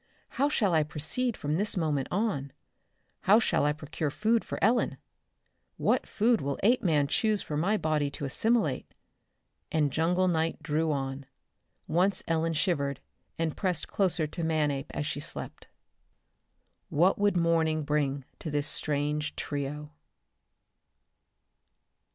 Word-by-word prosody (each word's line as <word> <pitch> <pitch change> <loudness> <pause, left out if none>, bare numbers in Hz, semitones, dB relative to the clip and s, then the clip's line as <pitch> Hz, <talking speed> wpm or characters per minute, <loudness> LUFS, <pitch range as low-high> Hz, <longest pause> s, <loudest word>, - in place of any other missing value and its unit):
How 280 +2 +1
shall 205 - +1
I 160 - +4
proceed 160 - -2
from 150 +2 -1
this 205 +1 0
moment 150 -5 0
on? 175 -9 -1 0.7
How 200 +3 +7
shall 225 -9 +2
I 150 - +3
procure 150 0 -3
food 220 +9 +1
for - - -5
Ellen? 235 +4 +2 0.8
What - - +1
food 225 +1 +2
will 140 0 -2
Apeman 180 - +3
choose 215 +6 +1
for 150 - -5
my 190 +8 +2
body 155 -5 0
to 145 0 -5
assimilate? 175 - +1 0.8
And 150 -4 +1
jungle 180 +3 +2
night 165 -2 0
drew 155 +1 0
on. 135 -1 -3 0.6
Once 185 +5 +1
Ellen 165 0 +1
shivered 140 -4 0 0.4
and 165 -2 -1
pressed 185 -3 -1
closer 180 -5 +1
to 165 +3 -4
Manape 150 -4 0
as 145 - -3
she 145 -1 -2
slept. - - -7 1.2
What 175 +7 +3
would 205 -2 +3
morning 165 -2 +2
bring 145 -2 -1
to 160 - -5
this 145 -1 -1
strange 150 0 0
trio? 145 +1 -4
160 Hz, 135 wpm, -29 LUFS, 145-185 Hz, 1.2 s, How